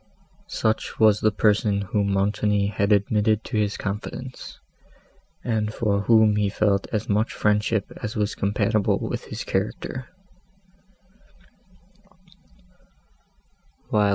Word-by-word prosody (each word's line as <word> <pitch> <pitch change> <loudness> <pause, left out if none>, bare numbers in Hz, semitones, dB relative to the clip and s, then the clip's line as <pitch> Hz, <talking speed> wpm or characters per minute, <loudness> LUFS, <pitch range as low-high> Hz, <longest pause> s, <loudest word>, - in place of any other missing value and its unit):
Such 110 0 -2
was 110 -2 +5
the 110 - +3
person 105 -1 +2
whom 100 0 0
Montoni 100 +1 +1
had 100 0 0
admitted 105 +1 +2
to - - -3
his 105 -1 0
confidence, 105 +5 -6 0.8
and 110 -3 -1
for 105 -2 0
whom 110 -1 +4
he 105 -1 +1
felt 100 -1 +1
as 105 -3 -2
much 105 +2 0
friendship 105 0 +1
as 105 +3 -4
was 105 -1 0
compatible 105 +1 +1
with - - -4
his - - -6
character. 130 0 -3
105 Hz, 105 wpm, -24 LUFS, 100-110 Hz, 0.8 s, was